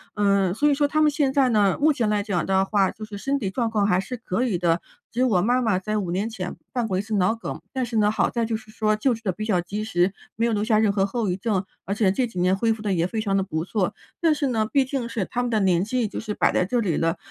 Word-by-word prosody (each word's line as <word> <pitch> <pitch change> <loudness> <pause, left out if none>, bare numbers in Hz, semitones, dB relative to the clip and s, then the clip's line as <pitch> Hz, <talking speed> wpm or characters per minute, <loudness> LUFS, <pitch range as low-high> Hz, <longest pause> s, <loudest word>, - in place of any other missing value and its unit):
嗯， 200 -3 +2
所 295 +8 +2
以 - - +4
说 290 +1 +2
他 310 +2 +1
们 305 - +5
现 285 -2 0
在 265 -2 +3
呢， 205 -4 +3
目 310 +1 +5
前 235 -6 0
来 210 -1 +1
讲 195 -6 -1
的 190 0 +2
话 195 -1 +2
就 215 - -11
是 210 -1 -7
身 275 +6 -1
体 195 -5 -2
状 230 +3 -1
况 210 -2 +2
还 180 -2 +3
是 225 +7 -4
可 225 -1 -2
以 210 -7 0
的， 170 -1 +2 0.3
只 235 - -5
有 255 - +4
我 185 -6 +3
妈 245 +5 +2
妈 220 -6 +1
在 215 +3 -2
5 190 -4 -2
年 195 +5 -1
前 185 -5 -5 0.2
犯 245 -3 -1
过 190 -3 -1
一 - - +1
次 215 +1 -3
脑 190 +2 +3
梗。 225 - -6
但 260 -1 -1
是 230 -1 -3
呢， 210 -1 +3
好 220 - +1
在 235 -2 -1
就 225 - -2
是 220 0 -8
说 215 -1 +1
救 245 +4 +1
治 225 - -13
得 190 - 0
比 215 - -6
较 195 -5 +2
及 200 +5 -4
时， 185 -2 +1 0.2
没 230 +1 +1
有 230 - +1
留 205 0 0
下 215 -1 +2
任 215 -2 +3
何 195 -1 +1
后 220 +1 -2
遗 180 - 0
症， 195 -2 -1 0.2
而 195 - -2
且 205 -3 +3
这 245 +5 0
几 185 -5 -6
年 180 +1 +3
恢 225 +3 +1
复 220 -1 -3
得 205 -2 0
也 170 -1 +1
非 220 +4 -3
常 195 -2 0
地 195 - +2
不 160 -4 -3
错。 190 -2 -1 0.3
但 325 -2 +4
是 285 - 0
呢， 220 -3 0
毕 275 -2 +3
竟 260 -3 -3
是 210 -5 -2
他 245 - -2
们 245 - -1
的 220 -2 +1
年 180 -2 +3
纪 235 +2 -1
就 - - -6
是 215 -1 -4
摆 - - +2
在 - - +2
这 245 +6 0
里 190 -9 0
了， 165 +1 0
215 Hz, 335 characters per minute, -24 LUFS, 190-235 Hz, 0.3 s, 们